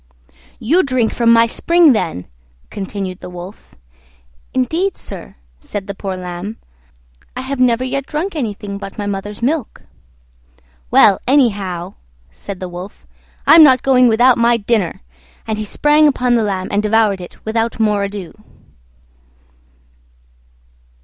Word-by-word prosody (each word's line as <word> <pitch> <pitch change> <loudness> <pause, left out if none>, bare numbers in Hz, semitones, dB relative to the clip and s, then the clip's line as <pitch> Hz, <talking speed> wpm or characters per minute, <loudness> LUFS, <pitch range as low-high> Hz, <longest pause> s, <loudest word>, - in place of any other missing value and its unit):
"You 320 +11 +2
drink 255 -7 0
from 235 -1 +3
my 230 0 +6
spring, 335 +5 +3
then," 165 - -3 0.5
continued 195 -2 -5
the - - -9
Wolf. 180 +3 -11 0.8
"Indeed, 330 +10 -1
sir," - - -9 0.2
said 195 - -6
the 200 - -5
poor 190 -1 -5
Lamb, 180 +4 -6 0.8
"I - - -3
have 265 0 -4
never 250 -1 +2
yet 275 +1 -3
drunk 330 +5 -3
anything 205 -7 -4
but 195 -1 -9
my 205 - -3
mother's 205 +2 -5
milk." 285 0 -2 1.1
"Well, 195 - +5
anyhow," 200 -9 +1 0.4
said 185 - -9
the 185 - -5
Wolf, 180 +3 -10 0.4
"I'm 330 - +8
not 260 -4 +6
going 255 -2 +4
without 240 +2 +4
my 235 0 +3
dinner": 210 -4 -1 0.4
and 215 -1 -3
he 215 - -3
sprang 295 +7 +3
upon 250 -3 +1
the 235 - +3
Lamb 190 -3 -2
and 205 - +1
devoured 210 -2 +1
it 175 - -11
without 225 +1 -2
more 210 -2 +1
ado. 200 -3 -6
220 Hz, 135 wpm, -17 LUFS, 195-255 Hz, 1.1 s, I'm